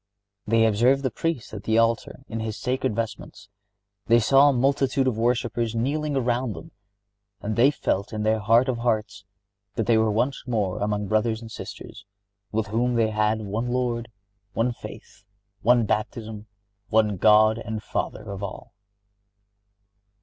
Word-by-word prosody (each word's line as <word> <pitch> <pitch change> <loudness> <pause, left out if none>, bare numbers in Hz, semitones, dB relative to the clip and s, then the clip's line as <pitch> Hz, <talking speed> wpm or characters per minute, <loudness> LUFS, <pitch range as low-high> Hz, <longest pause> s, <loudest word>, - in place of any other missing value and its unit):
They 115 +1 +4
observed 120 +6 +3
the 130 - 0
Priest 165 -2 -3
at 100 - -6
the 110 0 +2
altar 115 +2 +1
in 115 - -5
his 110 -1 -4
sacred 125 -4 -1
vestments. 105 -2 -5 0.6
They 115 +1 +6
saw 135 +5 +5
a - - +2
multitude 135 +1 +1
of 130 -4 +1
worshipers 115 0 0
kneeling 145 +5 -1
around 125 -2 0
them, 80 - -11 0.7
and 105 +2 -3
they 125 +4 +5
felt 100 -8 -2
in 105 -1 -3
their 110 0 +2
heart 115 +5 +4
of 125 -3 -1
hearts 110 -4 -1 0.5
that 115 - -1
they 115 -2 +4
were 110 0 +2
once 125 +5 -1
more 105 -6 -1
among 105 0 -1
brothers 110 +1 +1
and 115 -1 -10
sisters, 100 - -9 0.5
with 110 0 0
whom 120 +4 0
they 110 -2 +2
had 105 +1 +1
"one 110 +4 -3
Lord, 120 -1 -1 0.4
one 120 +3 0
faith, 105 - -12 0.4
one 120 +1 +4
baptism, 110 0 -3 0.4
one 105 -2 +2
God 110 +3 +5
and 110 -1 -5
Father 105 -1 -4
of 100 0 -6
all." 100 0 -7
115 Hz, 155 wpm, -25 LUFS, 105-120 Hz, 0.7 s, They